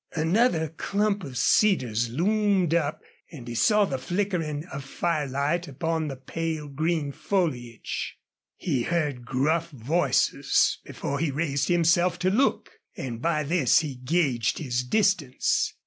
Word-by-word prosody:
Another 165 Hz, +1 st, +2 dB
clump 200 Hz, +5 st, -1 dB
of 130 Hz, -3 st, -7 dB
cedars 120 Hz, -, +2 dB
loomed 190 Hz, -, +1 dB
up, 155 Hz, -3 st, 0 dB, 0.3 s
and 130 Hz, -8 st, -10 dB
he 120 Hz, -, -5 dB
saw 210 Hz, -, +4 dB
the 135 Hz, -7 st, -3 dB
flickering 170 Hz, -3 st, -2 dB
of 140 Hz, 0 st, -5 dB
firelight 150 Hz, +2 st, -1 dB
upon 160 Hz, +3 st, -2 dB
the 135 Hz, -, -4 dB
pale 160 Hz, +3 st, -4 dB
green 155 Hz, +1 st, -1 dB
foliage. 155 Hz, -, -3 dB, 0.4 s
He 140 Hz, -8 st, -1 dB
heard 145 Hz, -5 st, -1 dB
gruff 160 Hz, +7 st, +1 dB
voices 150 Hz, +5 st, +1 dB
before 140 Hz, 0 st, -4 dB
he 165 Hz, -, 0 dB
raised 145 Hz, -1 st, -1 dB
himself 175 Hz, +1 st, +3 dB
to 185 Hz, +1 st, +1 dB
look, 255 Hz, +7 st, +1 dB, 0.3 s
and 120 Hz, -3 st, -5 dB
by 155 Hz, -1 st, +1 dB
this 150 Hz, -3 st, +3 dB
he 150 Hz, -3 st, -4 dB
gauged 125 Hz, -3 st, 0 dB
his 125 Hz, -5 st, -1 dB
distance. 165 Hz, -3 st, +1 dB
155 Hz, 130 wpm, -26 LUFS, 135-175 Hz, 0.4 s, saw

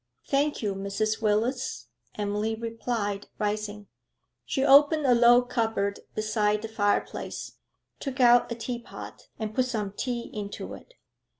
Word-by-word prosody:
'Thank 285 Hz, -1 st, 0 dB
you, 205 Hz, -2 st, 0 dB
Mrs. 200 Hz, +3 st, -2 dB
Willis,' 225 Hz, +5 st, 0 dB, 0.3 s
Emily 210 Hz, +2 st, -1 dB
replied, 225 Hz, -3 st, -3 dB
rising. 210 Hz, 0 st, -2 dB, 0.6 s
She 270 Hz, -1 st, 0 dB
opened 290 Hz, +2 st, +6 dB
a 250 Hz, -, +6 dB
low 240 Hz, +1 st, +6 dB
cupboard 225 Hz, -5 st, -1 dB, 0.2 s
beside 210 Hz, 0 st, +1 dB
the -, -, -3 dB
fireplace, 205 Hz, -2 st, -2 dB, 0.4 s
took 275 Hz, -1 st, -5 dB
out 245 Hz, -1 st, +6 dB
a -, -, -1 dB
tea 240 Hz, +1 st, -4 dB
pot, 235 Hz, -, -10 dB
and 215 Hz, -1 st, -4 dB
put 255 Hz, +3 st, +2 dB
some 215 Hz, -5 st, -2 dB
tea 240 Hz, +3 st, -4 dB
into 205 Hz, -1 st, -5 dB
it. -, -, -13 dB
225 Hz, 135 wpm, -27 LUFS, 210-245 Hz, 0.6 s, opened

